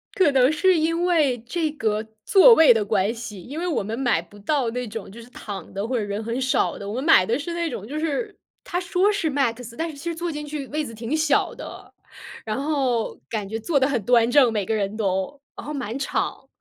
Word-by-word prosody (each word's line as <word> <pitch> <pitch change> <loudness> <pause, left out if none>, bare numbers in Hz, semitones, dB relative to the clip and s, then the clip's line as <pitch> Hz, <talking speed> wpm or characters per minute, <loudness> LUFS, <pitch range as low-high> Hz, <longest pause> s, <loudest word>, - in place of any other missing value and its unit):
可 370 -6 +4
能 260 0 +5
是 370 +3 +3
因 330 +2 +1
为 305 -8 +2
这 320 +2 -1
个 215 -6 -1 0.2
座 440 +5 +8
位 320 - +7
的 215 -2 0
关 200 +1 +1
系， 220 -4 -8
因 285 - -7
为 355 - -2
我 320 - 0
们 220 +4 -4
买 240 -11 +2
不 200 +4 -16
到 250 +1 0
那 250 +1 -4
种， 215 -2 -7
就 230 +4 -11
是 235 - -14
躺 200 -7 -8
的 200 +3 -3
或 255 +1 -1
者 225 - 0
人 205 +2 -4
很 235 +3 -3
少 260 0 +1
的。 200 - -7
我 210 - -4
们 260 - -3
买 310 - +6
的 230 +6 0
是 315 +4 -5
那 340 -2 -1
种， 210 -3 -6
就 300 +5 -5
是， 325 +8 -2 0.3
它 355 - -2
说 370 +2 +2
是 345 -6 -1
MAX， 245 -4 -1
但 330 +1 -2
是 310 - -9
其 280 - -11
实 340 -1 -2
坐 340 +1 -3
进 300 -1 -5
去 290 -2 -5
位 305 +1 -2
子 230 - -8
挺 230 +7 -2
小 310 -3 +1
的， - - -10 0.5
然 220 +4 -3
后 270 -6 0
感 210 -3 -3
觉 220 +1 -3
坐 290 +5 +1
得 265 0 +2
很 250 -6 -1
端 235 0 +4
正， 255 -3 +5
每 205 -3 -1
个 220 - 0
人 205 0 -2
都， 195 +6 -2 0.2
然 - - -8
后 300 - -4
满 245 -4 -4
场。 275 - -2
255 Hz, 270 characters per minute, -23 LUFS, 220-310 Hz, 0.5 s, 座